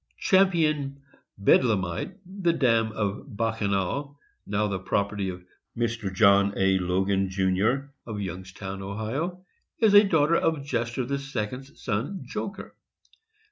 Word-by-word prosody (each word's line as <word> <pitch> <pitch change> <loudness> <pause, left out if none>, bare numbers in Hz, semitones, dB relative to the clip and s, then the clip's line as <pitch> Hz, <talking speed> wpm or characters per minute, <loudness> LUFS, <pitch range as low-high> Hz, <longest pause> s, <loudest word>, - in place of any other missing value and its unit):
Champion 155 -8 +2 0.4
Bedlamite, 100 - +2
the 185 -2 0
dam 115 -7 +2
of 105 -1 -4
Bacchanal, 110 +5 -1 0.3
now 105 +1 0
the 100 -2 -2
property 100 +1 -1
of 90 0 -7 0.3
Mr. 115 -4 -1
John 100 +1 +4
A. 95 0 +3
Logan, 95 +2 +1
Jr., 100 +9 +1 0.2
of 110 -3 -4
Youngstown, 95 +1 -6
Ohio, 125 - -4 0.3
is 220 -3 +4
a 205 +1 +9
daughter 165 -4 +3
of 160 -4 0
Jester 120 -2 -1
II. 140 +3 -2
's 135 0 -5
son 125 - -2
Joker. 200 - -6
110 Hz, 120 wpm, -26 LUFS, 95-140 Hz, 0.4 s, a